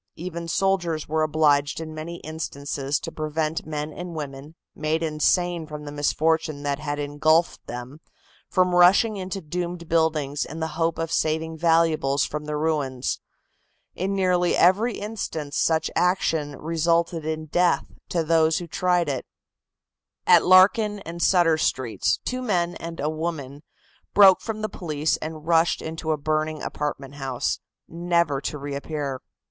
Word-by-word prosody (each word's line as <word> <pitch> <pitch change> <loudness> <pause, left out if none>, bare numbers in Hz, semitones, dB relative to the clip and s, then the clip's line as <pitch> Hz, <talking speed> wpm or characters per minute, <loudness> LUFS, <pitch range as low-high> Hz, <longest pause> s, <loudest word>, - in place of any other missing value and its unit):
Even 170 0 -6
soldiers 175 -3 0
were 155 +1 0
obliged 150 -2 +2
in 160 -1 -6
many 155 +2 -6
instances 145 -2 -3
to 165 - -6
prevent 155 0 -2
men 150 0 -4
and 175 -1 -7
women, 145 0 -7 0.2
made 155 +2 -1
insane 165 +2 +1
from 150 -1 -8
the 145 - -6
misfortune 155 0 0
that 140 -1 -1
had 145 -1 -3
engulfed 150 +3 +1
them, 125 +4 -7 0.5
from 180 -1 +2
rushing 185 +5 +5
into 190 0 -4
doomed 175 +1 -4
buildings 155 -3 +1
in 160 - -7
the 160 0 -2
hope 165 +1 0
of 165 0 -3
saving 160 0 0
valuables 160 -4 +2
from 150 0 -5
the 150 0 -3
ruins. 145 -5 -1 0.7
In 195 +2 -2
nearly 180 -2 +2
every 205 +7 +3
instance 175 -9 -5
such 160 -1 +1
action 160 -5 +1
resulted 165 +2 0
in 155 0 -3
death 175 +2 +2 0.2
to 170 -2 0
those 160 0 +3
who 175 - -4
tried 175 0 +1
it. 135 -3 -3 1.0
At - - +6
Larkin 205 +3 +5
and 170 +1 -7
Sutter 170 -4 +4
Streets, 130 -6 0
two 255 0 -2
men 175 -7 0
and 165 0 -7
a 145 - -1
woman 155 -3 -4 0.5
broke 195 -2 +8
from 215 -1 -5
the - - +1
police 155 -6 -1
and 155 -1 -7
rushed 165 0 +3
into 160 0 -4
a 155 - +1
burning 155 +1 -1
apartment 145 -2 -4
house, 135 -3 -2 0.3
never 170 -4 0
to 150 - -4
reappear. 140 -1 -4
160 Hz, 150 wpm, -24 LUFS, 150-170 Hz, 1.0 s, broke